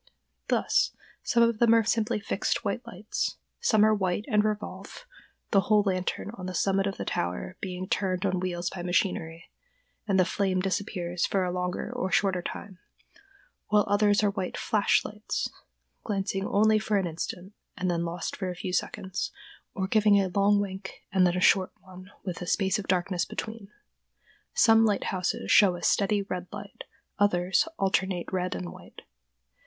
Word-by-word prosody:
Thus -, -, +2 dB, 0.3 s
some 235 Hz, -1 st, +3 dB
of 230 Hz, -2 st, +2 dB
them 230 Hz, -1 st, +6 dB
are 225 Hz, -, +4 dB
simply 225 Hz, 0 st, 0 dB
fixed 200 Hz, +3 st, -1 dB
white 205 Hz, +4 st, -1 dB
lights; 210 Hz, -1 st, -3 dB, 0.2 s
some 220 Hz, -, +4 dB
are 215 Hz, -, +4 dB
white 195 Hz, 0 st, -1 dB
and 210 Hz, -1 st, +3 dB
revolve—the 215 Hz, -, -4 dB
whole 210 Hz, +2 st, +3 dB
lantern 185 Hz, +1 st, -2 dB
on 185 Hz, -5 st, -7 dB
the 185 Hz, -, -5 dB
summit 195 Hz, +3 st, +1 dB
of 195 Hz, -, -4 dB
the -, -, -4 dB
tower 90 Hz, -, -3 dB
being 185 Hz, -1 st, -4 dB
turned 185 Hz, -1 st, 0 dB
on 185 Hz, -2 st, +1 dB
wheels 180 Hz, -1 st, -2 dB
by 185 Hz, -, -6 dB
machinery, 175 Hz, -2 st, -1 dB, 0.6 s
and 195 Hz, -2 st, +2 dB
the 185 Hz, -, +5 dB
flame 190 Hz, 0 st, 0 dB
disappears 180 Hz, -2 st, -1 dB
for 195 Hz, -2 st, +1 dB
a 180 Hz, -, -1 dB
longer 180 Hz, 0 st, -3 dB
or 190 Hz, -, -2 dB
shorter 190 Hz, -3 st, +2 dB
time; 190 Hz, +1 st, -7 dB, 0.9 s
while 210 Hz, 0 st, +3 dB
others 205 Hz, 0 st, +3 dB
are 205 Hz, -, +3 dB
white 190 Hz, -3 st, -4 dB
"flash" 210 Hz, -2 st, +2 dB
lights, 210 Hz, +1 st, -3 dB, 0.5 s
glancing 195 Hz, -1 st, -2 dB
only 215 Hz, +1 st, +4 dB
for 215 Hz, -1 st, 0 dB
an 195 Hz, -, +1 dB
instant, 175 Hz, +3 st, -5 dB, 0.2 s
and 185 Hz, -1 st, 0 dB
then 170 Hz, -1 st, 0 dB
lost 170 Hz, +1 st, -4 dB
for 190 Hz, -2 st, -3 dB
a 180 Hz, -, -4 dB
few 180 Hz, +1 st, -5 dB
seconds, 185 Hz, 0 st, -2 dB, 0.4 s
or 190 Hz, -, -1 dB
giving 210 Hz, -1 st, +4 dB
a 190 Hz, -1 st, +1 dB
long 200 Hz, +2 st, +3 dB
wink 190 Hz, -1 st, -5 dB
and 185 Hz, -2 st, +4 dB
then 175 Hz, +1 st, 0 dB
a -, -, -1 dB
short 185 Hz, 0 st, +4 dB
one 185 Hz, 0 st, -13 dB, 0.2 s
with 180 Hz, -2 st, -4 dB
a 180 Hz, -, -5 dB
space 190 Hz, +2 st, +1 dB
of 200 Hz, -, -6 dB
darkness 180 Hz, -1 st, +1 dB
between. 220 Hz, 0 st, -6 dB, 0.9 s
Some 225 Hz, -, +6 dB
lighthouses 195 Hz, -4 st, 0 dB
show 195 Hz, -4 st, +6 dB
a 175 Hz, -, -9 dB
steady 205 Hz, 0 st, +2 dB
red 180 Hz, -2 st, -5 dB
light; -, -, -9 dB, 0.3 s
others, 185 Hz, -, +2 dB
alternate 190 Hz, -2 st, 0 dB
red 185 Hz, -1 st, -1 dB
and 90 Hz, -2 st, -5 dB
white. -, -, -13 dB
195 Hz, 170 wpm, -28 LUFS, 180-210 Hz, 0.9 s, them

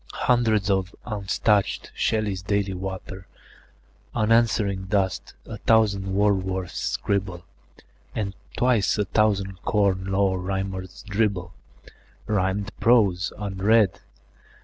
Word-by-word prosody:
Hundreds 110 Hz, -5 st, +2 dB
of 95 Hz, -1 st, -1 dB
unstaunched 105 Hz, 0 st, 0 dB
Shelleys 105 Hz, -4 st, -1 dB
daily 100 Hz, 0 st, -1 dB
water 95 Hz, 0 st, -6 dB, 0.9 s
Unanswering 110 Hz, -3 st, +2 dB
dust; 95 Hz, -2 st, -1 dB
a 110 Hz, -, -7 dB
thousand 105 Hz, -3 st, +2 dB
Wordsworths 95 Hz, -3 st, +1 dB
scribble; 95 Hz, -4 st, -2 dB, 0.7 s
And 100 Hz, -3 st, -2 dB, 0.2 s
twice 120 Hz, -6 st, +2 dB
a 105 Hz, -, +1 dB
thousand 100 Hz, -2 st, 0 dB
Corn 100 Hz, -3 st, +1 dB
Law 95 Hz, -1 st, +1 dB
Rhymers 95 Hz, 0 st, -4 dB
dribble 100 Hz, -4 st, -1 dB, 0.7 s
Rhymed 100 Hz, 0 st, -1 dB
prose, 100 Hz, -6 st, +3 dB
unread. 100 Hz, +1 st, +2 dB
100 Hz, 95 wpm, -24 LUFS, 95-105 Hz, 0.9 s, prose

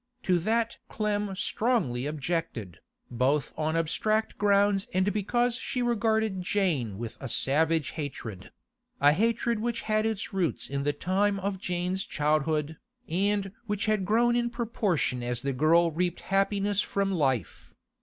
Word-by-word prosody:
To 180 Hz, -2 st, +2 dB
that 225 Hz, +5 st, 0 dB
Clem 210 Hz, -2 st, -1 dB
strongly 185 Hz, -, 0 dB
objected, 150 Hz, -, -3 dB, 0.3 s
both 130 Hz, +4 st, +1 dB
on 155 Hz, +1 st, -1 dB
abstract 215 Hz, +7 st, 0 dB
grounds 200 Hz, -1 st, +3 dB
and 190 Hz, +2 st, +2 dB
because 240 Hz, +4 st, +1 dB
she 250 Hz, +1 st, -2 dB
regarded 220 Hz, -4 st, +1 dB
Jane 165 Hz, -, 0 dB
with 115 Hz, +1 st, -6 dB
a 135 Hz, -, -5 dB
savage 155 Hz, +5 st, +1 dB
hatred—a 140 Hz, -, -3 dB
hatred 230 Hz, +5 st, +1 dB
which 235 Hz, +1 st, -2 dB
had 215 Hz, 0 st, +1 dB
its 215 Hz, -2 st, -3 dB
roots 185 Hz, -4 st, -1 dB
in 140 Hz, 0 st, -2 dB
the 145 Hz, +1 st, +1 dB
time 195 Hz, +6 st, +1 dB
of 195 Hz, 0 st, -3 dB
Jane's 180 Hz, +2 st, -1 dB
childhood, 155 Hz, 0 st, 0 dB, 0.3 s
and 195 Hz, +2 st, 0 dB, 0.2 s
which 210 Hz, +1 st, -1 dB
had 215 Hz, -3 st, +1 dB
grown 235 Hz, +5 st, +3 dB
in 240 Hz, 0 st, +1 dB
proportion 210 Hz, -, -1 dB
as 120 Hz, 0 st, -2 dB
the 140 Hz, 0 st, -1 dB
girl 165 Hz, +5 st, +4 dB
reaped 175 Hz, +2 st, -1 dB
happiness 200 Hz, +1 st, +1 dB
from 200 Hz, 0 st, -1 dB
life. 135 Hz, -, -1 dB
190 Hz, 140 wpm, -28 LUFS, 150-215 Hz, 0.3 s, girl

